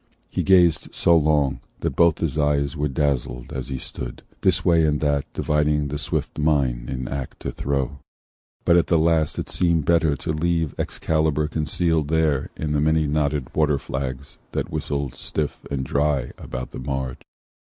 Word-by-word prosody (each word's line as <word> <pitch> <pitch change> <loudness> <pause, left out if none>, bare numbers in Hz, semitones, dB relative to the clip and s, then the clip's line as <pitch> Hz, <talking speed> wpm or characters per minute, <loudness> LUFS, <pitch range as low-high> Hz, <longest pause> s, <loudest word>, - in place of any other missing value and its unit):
He - - 0
gazed 90 -5 +4
so 85 - +4
long 75 -3 +2 0.2
That - - -1
both 85 -2 +4
his 80 -4 -1
eyes 75 -2 +1
were 75 0 0
dazzled 65 -3 -1
as 65 -2 -4
he 65 - -3
stood, - - -7 0.2
This 95 -2 +2
way 85 -3 +5
and 75 -1 +2
that 70 -2 0
dividing 75 -1 +1
the 75 +1 -3
swift 65 - -3
mind, 70 -6 +1
In 65 -1 -3
act 65 -2 -5
to - - -3
throw: 70 0 -2 0.7
but 85 - +5
at 85 -3 +3
the 85 - +3
last 80 -1 +2
it - - -3
seemed 85 -4 +1
Better 80 -3 +3
to 70 +3 -3
leave 80 -1 0
Excalibur 80 -1 0
concealed 80 0 0
There 80 -3 +1
in 75 -1 -3
the 75 -1 +1
many 80 +1 +3
knotted 75 -2 -1
waterflags, 70 -3 -1
That - - -2
whistled 70 -3 -2
stiff 75 +2 -4
and 65 -2 -2
dry 70 -2 0
about 65 -1 -6
the - - -7
marge. 65 -1 -3
75 Hz, 170 wpm, -23 LUFS, 70-80 Hz, 0.7 s, way